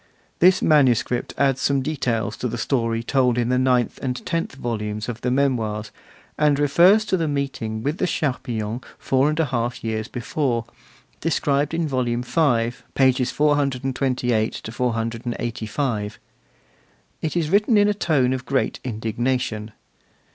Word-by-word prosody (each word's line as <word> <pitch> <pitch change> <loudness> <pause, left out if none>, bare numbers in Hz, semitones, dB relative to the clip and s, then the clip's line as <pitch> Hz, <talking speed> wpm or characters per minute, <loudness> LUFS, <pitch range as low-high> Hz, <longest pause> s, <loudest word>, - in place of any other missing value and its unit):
This 185 +2 +5
manuscript 125 -5 +3
adds 135 -1 +2
some 140 -1 +1
details 120 -7 -1
to 125 - -2
the 120 0 -4
story 115 -2 0
told 125 -1 +2
in 120 -1 +1
the 125 0 +2
ninth 125 -2 +1
and 125 -1 -3
tenth 165 -5 -2
volumes 105 -4 -3
of 120 -1 -5
the 125 - 0
Memoirs, 115 -6 0 0.5
and 150 -2 +4
refers 175 +9 +5
to 190 - +1
the 165 -2 0
meeting 135 -6 -3
with 150 +5 -2
the - - +1
Charpillons 120 -7 -2 0.2
four 135 +2 +2
and 155 +1 -2
a 160 - +3
half 120 -2 -2
years 110 -1 -2
before, 120 -2 -2 0.5
described 145 -1 0
in 165 -1 0
Volume 125 -3 -1
V., 125 -6 +2 0.2
pages 130 -1 +3
428 130 -6 0
485. 115 -1 -2 1.0
It 160 +2 -2
is 160 -2 0
written 210 +3 +4
in 205 0 +5
a 210 - +2
tone 145 -10 +1
of 130 0 -3
great 135 -1 0
indignation. 115 -1 -2
130 Hz, 140 wpm, -22 LUFS, 115-145 Hz, 1.0 s, This